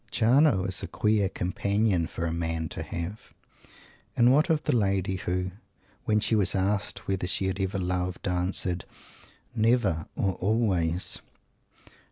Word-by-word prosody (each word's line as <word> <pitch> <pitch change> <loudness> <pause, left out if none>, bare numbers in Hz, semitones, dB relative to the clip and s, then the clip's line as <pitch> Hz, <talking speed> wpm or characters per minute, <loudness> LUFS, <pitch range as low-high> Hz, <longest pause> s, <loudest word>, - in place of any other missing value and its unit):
Jarno 120 -2 +4
is 95 - -1
a - - -4
queer 105 -2 +1
companion 100 0 0
for 85 - -4
a 80 - -1
man 80 -1 -2
to - - -5
have. 85 +6 -6 0.8
And 120 +1 +6
what 150 +6 +3
of 155 -2 +2
the 150 - +1
lady 95 -3 +1
who, 90 0 -2 0.5
when 105 0 +3
she 110 - 0
was 100 -3 +2
asked 100 +2 -1
whether 95 -2 -1
she 95 - -1
had 95 +1 -2
ever 95 +1 -1
loved, 90 +1 -2
answered, 90 0 0 0.7
"never 110 -8 +2
or 95 -1 0
always"? 95 -5 +1
95 Hz, 145 wpm, -27 LUFS, 90-110 Hz, 0.8 s, And